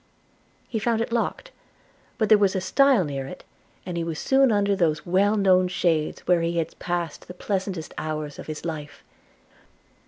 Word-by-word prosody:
He 225 - -2
found 230 +1 0
it 230 - -2
locked; 240 - -2 0.7
but 220 - +1
there 215 - +7
was 200 -2 +2
a - - +1
stile 270 +1 +4
near 135 -2 -4
it, - - -10 0.4
and 180 -2 -4
he 170 - -1
was 165 -2 -4
soon 270 - +3
under 200 -1 +2
those 160 -5 0
well 200 +4 +2
known 185 -2 +4
shades 165 -4 0
where 175 -2 +2
he 170 +1 -1
had 165 - -3
passed 175 -3 -3
the 180 - -9
pleasantest 190 -4 -3
hours 155 -1 -4
of - - -9
his 155 +1 -6
life. 150 -3 -6
180 Hz, 180 wpm, -24 LUFS, 160-205 Hz, 0.7 s, there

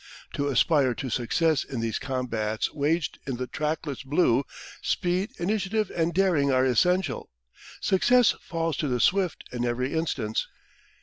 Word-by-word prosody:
To 145 - -1
aspire 135 -1 +3
to 130 -3 -5
success 155 +7 +1
in 130 - -5
these 115 -1 -1
combats 115 -5 -2
waged 150 +3 0
in 135 - -2
the 125 - -3
trackless 150 0 -3
blue, 135 -2 +2 0.4
speed, 180 +3 0
initiative, 205 +3 -1
and 165 0 +1
daring 170 -6 +2
are 130 0 +3
essential. 155 +2 +1 0.5
Success 245 +6 +4
falls 165 -3 -2
to 150 - -1
the 125 -2 0
swift 185 +5 +1
in 120 -1 -3
every 125 +2 -1
instance. 135 -9 -1
145 Hz, 140 wpm, -26 LUFS, 125-175 Hz, 0.5 s, Success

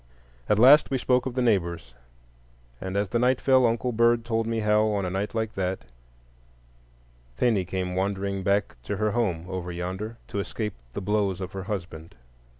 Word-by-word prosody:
At 105 - +4
last 135 +7 +7
we 135 - 0
spoke 125 0 +1
of 125 - -5
the 125 - +1
neighbors, 85 - 0 0.9
and 95 +1 -3
as 100 +1 -1
night 125 +2 +3
fell, 130 -2 +4
Uncle 115 +2 -1
Bird 115 0 +3
told 115 -1 -1
me 115 -1 -1
how, 105 0 +3
on 100 -3 -1
a 90 - -3
night 100 +4 -3
like 110 -1 -1
that, 95 -7 -3 1.5
'Thenie 105 - +2
came 90 0 -3
wandering 100 +1 -1
back 100 -4 0
to 100 - -3
her 110 +1 +1
home 90 -9 -1
over 90 -1 -4
yonder, 95 +6 -5
to 100 - -3
escape 105 +1 -3 0.2
the - - -4
blows 100 -2 0
of 95 -1 -5
her 95 -1 -6
husband. 85 -5 -6
105 Hz, 175 wpm, -26 LUFS, 95-115 Hz, 1.5 s, last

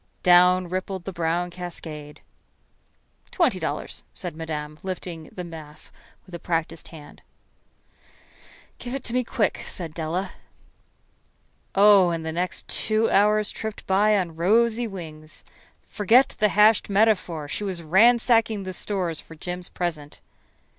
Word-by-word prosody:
Down 180 0 +5
rippled 185 +1 -4
the 195 - -5
brown 170 +1 -1
cascade. 160 -4 -8 1.1
"Twenty - - +1
dollars," - - -4
said - - -6
Madame, 155 -1 -6
lifting 180 -3 -6
the 180 - -7
mass 155 -3 -10 0.3
with 185 - -17
a 170 - -5
practiced 165 -2 -3
hand. 150 -3 -13 1.6
"Give 245 +2 -5
it 275 - -5
to 235 - -3
me 250 0 +1
quick," 230 -2 -1
said 170 -5 -7
Della. 170 +4 -3 1.4
Oh, 200 -2 +6
and 165 -1 -3
the 160 - -2
next 180 +3 -2
two 220 +1 0
hours 210 +1 +3
tripped 220 -1 -6
by 205 +2 +3
on 175 -4 -2
rosy 230 +7 +2
wings. 155 -6 -9 0.4
Forget 230 +6 +3
the 210 0 +4
hashed 210 +2 +4
metaphor. 195 -7 +1
She 175 - -4
was 185 -4 -4
ransacking 225 +3 +4
the 185 0 -5
stores 180 -4 -2
for 165 - -14
Jim's 180 +2 -6
present. 160 -5 -4
180 Hz, 135 wpm, -24 LUFS, 165-210 Hz, 1.6 s, Oh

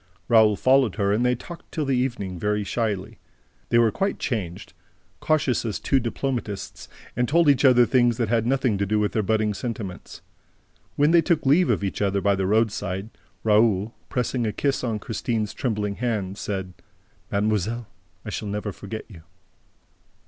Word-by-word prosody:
Raoul 110 -3 +5
followed 130 -1 +3
her 100 -1 +1
and 110 +4 +1
they 125 0 +2
talked 170 +8 -11
till 155 -3 -2
the 135 -1 +1
evening, 120 -8 -2
very 105 +1 0
shyly. 105 -3 -3 0.5
They 120 - +3
were 115 -2 +4
quite 195 - -1
changed, 95 -7 -4 0.5
cautious 150 -5 +1
as 110 -3 -3
two 135 - +2
diplomatists, 120 -4 -4 0.3
and 125 +2 +1
told 170 +2 +4
each 140 -2 +4
other 125 -3 +6
things 120 -2 +3
that 115 - 0
had 115 +1 +1
nothing 130 -6 +1
to 100 - 0
do 105 +2 +1
with 105 -1 +1
their 110 - 0
budding 110 +1 +1
sentiments. 105 -4 -6 0.7
When 145 +2 +3
they 170 0 +6
took 165 -4 0
leave 155 +7 +4
of - - +1
each 95 - -3
other 100 -1 +1
by 100 +1 +2
the 95 -1 -1
roadside, 105 -1 0 0.3
Raoul, 105 -1 +3 0.2
pressing 125 -1 -1
a - - 0
kiss 140 +4 -1
on 115 -3 -1
Christine's 105 +2 -3
trembling 105 -5 -2
hand, 105 -6 -2
said: 95 -2 -4 0.6
"Mademoiselle, 110 +3 0 0.4
I - - -5
shall 105 - -4
never 105 +1 -3
forget 105 +3 -7
you!" 90 -8 -13
110 Hz, 170 wpm, -24 LUFS, 100-125 Hz, 0.7 s, other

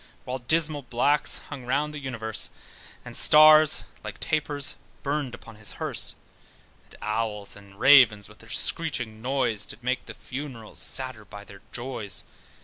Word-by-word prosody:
While 130 +1 -4
dismal 155 +3 +1
blacks 130 +4 +2
hung 140 -4 -8
round 140 +5 -1
the 150 - -6
universe, 115 -5 +1 0.6
And - - -8
stars 155 0 +7 0.2
(like - - -8
tapers) 145 -2 -1 0.3
burned 140 -3 -2
upon 115 -2 -14
his 110 -1 -5
hearse: - - -1 0.7
And - - -17
owls 105 -2 -3
and 100 -1 -16
ravens 120 -8 +6
with - - -17
their - - -16
screeching 115 -9 -1
noise 125 -4 0
Did 120 - -12
make 130 +1 -2
the 110 - -9
funerals 120 +1 -8
sadder 130 -5 -4
by 105 0 -11
their 100 -1 -15
joys. 120 -6 -5
125 Hz, 145 wpm, -25 LUFS, 110-145 Hz, 0.7 s, stars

